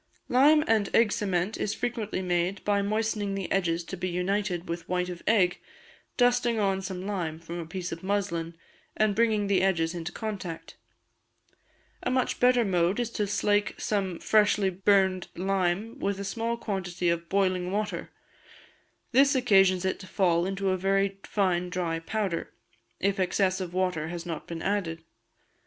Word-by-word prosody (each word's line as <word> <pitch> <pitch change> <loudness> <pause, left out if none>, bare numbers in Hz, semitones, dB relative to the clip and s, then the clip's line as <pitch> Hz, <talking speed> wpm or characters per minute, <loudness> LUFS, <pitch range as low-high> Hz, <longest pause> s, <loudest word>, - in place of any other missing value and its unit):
Lime 295 +5 +5
and 220 -3 +2
Egg 230 -3 +5
Cement 195 -1 -1
is 210 - -2
frequently 225 -5 -3
made 180 +2 0
by 205 -1 +2
moistening 210 -1 -1
the 195 -2 -4
edges 170 -3 +1
to 190 - -6
be 185 0 -3
united 180 0 -1
with 170 0 -5
white 180 0 0
of 175 -1 -7
egg, 190 -5 +3 0.6
dusting 245 -1 +3
on 195 -2 +1
some 190 -1 -5
lime 175 -6 -3
from 170 +1 -7
a 165 - -6
piece 180 +1 -5
of 165 - -6
muslin, 185 -4 -2 0.4
and 215 -1 +3
bringing 220 -2 +2
the 195 -2 +2
edges 170 -3 +1
into 170 -1 -5
contact. 195 -7 -6 1.3
A - - -1
much 255 -1 0
better 245 -1 +4
mode 180 +1 +1
is 240 -1 -1
to 210 -3 -1
slake 205 +1 +1
some 190 -4 -1
freshly 210 -2 +3
burned 190 -1 +2
lime 195 +6 -1
with 200 -4 -1
a - - -3
small 230 +4 -2
quantity 185 -5 -3
of 170 0 -2
boiling 185 -2 +1
water; 210 +1 -2 1.0
this 275 +3 +5
occasions 195 -7 +4
it 190 - -1
to 185 - -10
fall 175 -3 +2
into 195 0 -1
a 185 - +1
very 195 +1 +1
fine 180 -4 0
dry 175 -3 -2
powder, 190 0 -3 0.5
if 195 +1 0
excess 185 0 +1
of 180 -2 -4
water 180 -4 -1
has 170 0 -6
not 165 -3 -5
been 165 -1 -6
added. 180 -5 -1
195 Hz, 165 wpm, -28 LUFS, 180-210 Hz, 1.3 s, Lime